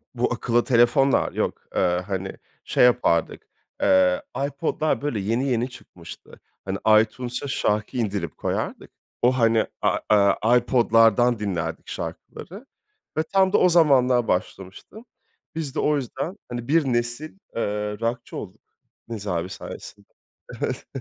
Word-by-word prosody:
bu 120 Hz, 0 st, 0 dB
akıllı 120 Hz, 0 st, +1 dB
telefonlar 125 Hz, +2 st, +3 dB
yok. -, -, -2 dB
Eee, 90 Hz, +1 st, +1 dB
hani, 95 Hz, -1 st, -3 dB, 0.3 s
şey -, -, +2 dB
yapardık, 115 Hz, -9 st, +1 dB, 0.3 s
eee, 90 Hz, -1 st, +4 dB, 0.3 s
iPod'lar, 155 Hz, +2 st, -1 dB
böyle, 140 Hz, -7 st, -2 dB
yeni 115 Hz, +7 st, -1 dB
yeni 125 Hz, 0 st, 0 dB
çıkmıştı. 85 Hz, -8 st, -13 dB, 0.3 s
Hani, 95 Hz, 0 st, -2 dB, 0.3 s
iTunes'a 125 Hz, +4 st, -6 dB
şarkı 105 Hz, -1 st, -1 dB
indirip 100 Hz, -6 st, -2 dB
koyardık. -, -, -4 dB, 0.3 s
O, 125 Hz, -, +5 dB
hani, 115 Hz, -2 st, +3 dB, 0.2 s
a -, -, +2 dB
aaa, 105 Hz, +3 st, +4 dB
iPod'lardan 120 Hz, -1 st, +3 dB
dinlerdik 85 Hz, -6 st, -3 dB
şarkıları 200 Hz, +9 st, -8 dB, 0.5 s
ve 155 Hz, -, +2 dB
tam 190 Hz, +3 st, +2 dB
da -, -, +6 dB
o 180 Hz, -, +4 dB
zamanlar 130 Hz, -8 st, +4 dB
başlamıştım. 95 Hz, -, -4 dB, 0.5 s
Biz 155 Hz, -5 st, -4 dB
de -, -, -1 dB
o 150 Hz, -, +2 dB
yüzden, 145 Hz, -, -4 dB
hani, 120 Hz, -1 st, -5 dB
1 160 Hz, +1 st, +3 dB
nesil, 120 Hz, +7 st, -2 dB, 0.2 s
eee, 105 Hz, -2 st, -2 dB
rockçı 115 Hz, +1 st, -3 dB
olduk -, -, -9 dB, 0.5 s
Nez 110 Hz, -3 st, -6 dB
abi 90 Hz, -1 st, -2 dB
sayesinde. 100 Hz, +1 st, -10 dB, 0.5 s
Evet. -, -, -3 dB
120 Hz, 130 wpm, -24 LUFS, 105-135 Hz, 0.5 s, da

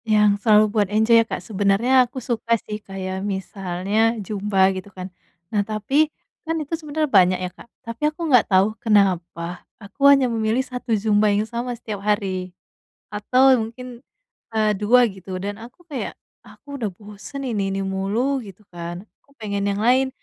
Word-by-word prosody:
Yang 210 Hz, -2 st, +3 dB
selalu 215 Hz, -1 st, +5 dB
buat 210 Hz, -2 st, +2 dB
enjoy 220 Hz, +2 st, +4 dB
ya, -, -, -2 dB
Kak? -, -, -4 dB
Sebenernya 205 Hz, +3 st, +1 dB, 0.2 s
aku 255 Hz, -, -12 dB
suka 230 Hz, -2 st, 0 dB
sih 210 Hz, 0 st, -6 dB
kayak 190 Hz, -1 st, -5 dB
misalnya 195 Hz, +3 st, -1 dB
zumba 195 Hz, -1 st, +1 dB
gitu 185 Hz, +1 st, -7 dB
kan. 185 Hz, -1 st, -9 dB, 0.4 s
Nah 205 Hz, -, +2 dB
tapi, 220 Hz, +9 st, +1 dB, 0.3 s
kan 325 Hz, 0 st, -3 dB
itu 305 Hz, 0 st, -5 dB
sebenernya 310 Hz, -1 st, -1 dB
banyak 185 Hz, -8 st, +4 dB
ya, 180 Hz, 0 st, -4 dB
Kak, -, -, -16 dB, 0.2 s
tapi 230 Hz, +2 st, -8 dB
aku 320 Hz, +2 st, -6 dB
nggak 255 Hz, -7 st, +4 dB
tau 195 Hz, +2 st, +3 dB
kenapa 180 Hz, -5 st, +1 dB, 0.2 s
aku 210 Hz, +7 st, -3 dB
hanya 275 Hz, -2 st, +6 dB
memilih 225 Hz, +1 st, 0 dB
1 250 Hz, -1 st, -8 dB
zumba 210 Hz, 0 st, +2 dB
yang 210 Hz, +1 st, +1 dB
sama 240 Hz, +1 st, -4 dB
setiap 215 Hz, -3 st, -6 dB
hari. 195 Hz, -3 st, -1 dB, 0.6 s
Atau 255 Hz, +4 st, +4 dB
mungkin, 245 Hz, 0 st, -11 dB, 0.5 s
eee, 215 Hz, -1 st, +2 dB
2 240 Hz, +5 st, +4 dB
gitu, 190 Hz, -1 st, -8 dB
dan 205 Hz, +1 st, -4 dB
aku 250 Hz, +10 st, -14 dB
kayak, 280 Hz, -4 st, -4 dB, 0.3 s
"Aku 285 Hz, -1 st, -11 dB
udah 215 Hz, -, 0 dB
bosen 210 Hz, +7 st, -9 dB
ini 205 Hz, -6 st, -1 dB
ini 195 Hz, -, -2 dB
mulu," 200 Hz, +8 st, -1 dB
gitu 195 Hz, 0 st, -13 dB
kan, 175 Hz, +2 st, -7 dB, 0.2 s
aku -, -, -28 dB
pengen 200 Hz, -2 st, -2 dB
yang 200 Hz, -, -1 dB
lain, 255 Hz, +3 st, +3 dB
210 Hz, 170 wpm, -22 LUFS, 195-245 Hz, 0.6 s, hanya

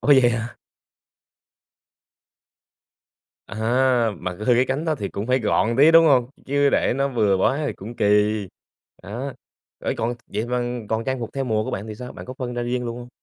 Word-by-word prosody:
Ủa, -, -, -6 dB
vậy 130 Hz, -4 st, +7 dB
hả? 115 Hz, 0 st, -2 dB, 3.0 s
À, -, -, -9 dB, 0.6 s
mà 90 Hz, -, -4 dB
c -, -, -16 dB
hư 110 Hz, +4 st, +2 dB
cái 125 Hz, +2 st, +4 dB
cánh 135 Hz, +4 st, -1 dB
đó 160 Hz, -2 st, +1 dB
thì 105 Hz, -8 st, -4 dB
cũng 100 Hz, +2 st, -5 dB
phải 130 Hz, +1 st, +2 dB
gọn 115 Hz, +1 st, +1 dB
tí, 145 Hz, +4 st, +7 dB
đúng 165 Hz, 0 st, +7 dB
hông? 130 Hz, -4 st, +3 dB, 0.2 s
Chứ 140 Hz, +1 st, +2 dB
để -, -, +2 dB
nó 140 Hz, 0 st, +1 dB
bừa 110 Hz, -7 st, +2 dB
quá 135 Hz, +10 st, +1 dB
thì -, -, -2 dB
cũng 115 Hz, +5 st, -10 dB
kỳ, -, -, 0 dB, 1.0 s
á, 120 Hz, +8 st, -5 dB, 0.5 s
ê, -, -, 0 dB
còn 115 Hz, +2 st, -1 dB
vậy 105 Hz, +3 st, -3 dB
mà 125 Hz, 0 st, -1 dB, 0.3 s
còn 110 Hz, +1 st, -1 dB
trang 130 Hz, -1 st, -2 dB
phục 115 Hz, -1 st, -5 dB
theo 135 Hz, -1 st, -2 dB
mùa 110 Hz, -3 st, 0 dB
của -, -, -4 dB
bạn 100 Hz, -, -4 dB
thì 110 Hz, -, -6 dB
sao, 125 Hz, +3 st, -8 dB
bạn -, -, -10 dB
có 130 Hz, -, -7 dB
phân 125 Hz, -2 st, -4 dB
ra 120 Hz, -, -2 dB
riêng 125 Hz, +1 st, -2 dB
luôn 115 Hz, 0 st, -4 dB
hông? 120 Hz, 0 st, -9 dB
120 Hz, 210 wpm, -23 LUFS, 110-135 Hz, 3.0 s, vậy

